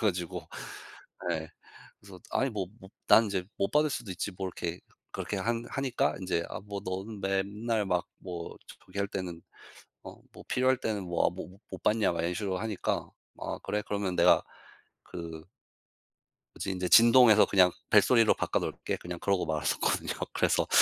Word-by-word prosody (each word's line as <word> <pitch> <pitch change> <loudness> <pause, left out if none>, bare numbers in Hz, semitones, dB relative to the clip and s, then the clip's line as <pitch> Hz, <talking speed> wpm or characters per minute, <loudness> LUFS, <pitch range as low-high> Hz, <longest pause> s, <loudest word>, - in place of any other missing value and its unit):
가지고 90 -5 -1 0.9
예 80 -1 -3 0.5
그래서 100 -2 -13
아니 135 +1 +1
뭐 100 -5 -3
모 95 - -13 0.2
난 115 - +7
이제 100 -3 -1
못 100 - 0
받을 150 +1 +3
수도 120 -8 -4
있지 90 +3 -3
뭐 95 0 -4 0.6
그렇게 100 - -3
한 115 +4 -1
하니까 135 -3 0
인제 90 -3 -1
"아 - - -5
뭐 100 0 -6
너는 95 +3 -4
맨날 105 +3 0
막 90 -2 0
뭐 85 -3 -7 0.3
저기 100 - -6
할 100 - +1
때는 90 -4 -5 0.6
어 - - -11
뭐 - - -12
필요할 130 +1 +3
때는 105 -6 -2
뭐 85 -1 +1
모 90 - -7 0.2
못 - - -8
받냐." 105 -3 +3
막 85 - -2
이런식으로 90 +2 -1
하니까 110 -2 -2 0.3
"아 - - -4
그래 105 0 -1
그러면 100 -3 -2
내가 - - +6 0.6
그" 80 -2 -7 1.1
"그래서 - - -4
인제 90 -1 -2
진동에서 115 -2 +8
그냥 90 -2 +5 0.2
벨소리로 110 +2 +6
바꿔 - - 0
놓을게." - - -3
그냥 90 0 -7
그러고 100 -1 +1
말았었거든요. 80 -1 0 0.2
그래서 - - +2
100 Hz, 310 characters per minute, -30 LUFS, 90-110 Hz, 1.1 s, 진동에서